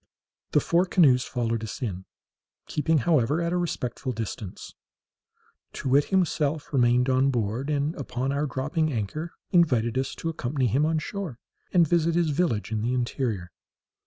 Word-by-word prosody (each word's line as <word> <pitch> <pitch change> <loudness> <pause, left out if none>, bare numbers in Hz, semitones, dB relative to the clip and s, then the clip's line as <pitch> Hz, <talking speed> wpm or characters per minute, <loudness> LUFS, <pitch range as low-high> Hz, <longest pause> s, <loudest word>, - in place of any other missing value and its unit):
The - - +6
four 170 +5 +2
canoes 135 -10 +4
followed 115 -2 -2
us 110 - -6
in, 95 -6 -4 0.6
keeping, 155 +2 +1
however, 150 -1 +3
at 170 0 -1
a - - +1
respectful 130 -7 -2
distance. 110 -3 -6 1.0
Too 130 - -4
wit 140 +3 +4
himself 155 -5 0
remained 125 -1 +3
on 130 +1 +3
board, 120 +2 -1
and, 145 +1 0
upon 135 -2 -3
our 145 +2 0
dropping 150 +4 -1
anchor, 140 +9 -3 0.2
invited 130 -9 +3
us 135 0 -3
to 165 - -3
accompany 135 -3 -1
him 135 +7 +2
on 160 0 +1
shore, 165 - -4 0.3
and 175 -3 +4
visit 170 +1 +2
his 170 -3 +2
village 140 -9 0
in 110 -1 -1
the 120 +3 0
interior. 120 -7 -2
135 Hz, 160 wpm, -26 LUFS, 120-160 Hz, 1.0 s, The